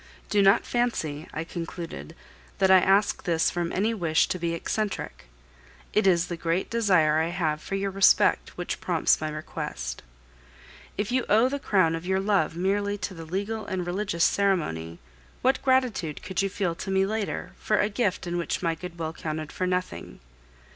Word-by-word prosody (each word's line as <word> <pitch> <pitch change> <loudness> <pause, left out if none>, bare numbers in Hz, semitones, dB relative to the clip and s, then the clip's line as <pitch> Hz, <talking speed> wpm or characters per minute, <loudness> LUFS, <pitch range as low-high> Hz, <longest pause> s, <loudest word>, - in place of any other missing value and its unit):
"Do 205 - +4
not 195 0 +5
fancy," 165 -12 -1
I 155 - -3
concluded, 165 -1 -7 0.4
"that 190 -1 +4
I 190 - +9
ask 195 +3 +2
this 165 -3 +2
from 175 -1 -2
any 215 +4 +1
wish 165 -7 +2
to 185 - -2
be 170 0 -1
eccentric. 210 - -3 0.7
It 215 -2 +3
is 170 -2 +4
the 175 - -4
great 165 +2 -1
desire 180 -10 +3
I 160 - +1
have 160 -4 -1
for 195 - -4
your 195 0 -1
respect 195 +1 +3
which - - -4
prompts - - +2
my 155 - -2
request. 155 0 -5 1.0
If 205 +3 -2
you 255 0 +2
owe 225 +5 +5
the 280 +1 -3
crown 185 -10 +2
of 165 +2 -5
your 190 0 +2
love 195 -5 +1
merely 200 +3 0
to 200 - -4
the 165 -2 -9
legal 200 +6 -3
and 185 -2 -2
religious 175 -1 -1
ceremony, 85 - +1 0.5
what 260 +1 +3
gratitude 255 - +1
could 190 0 -1
you 195 - 0
feel 190 -3 -1
to 165 - -7
me 190 0 +3
later 215 0 -3
for 215 - +1
a 205 - +3
gift 205 -3 -1
in 175 0 -2
which 170 - -2
my 165 -1 +2
goodwill 165 -1 -6
counted 155 -1 -5
for 185 - -2
nothing? 180 - -3
185 Hz, 180 wpm, -26 LUFS, 165-205 Hz, 1.0 s, I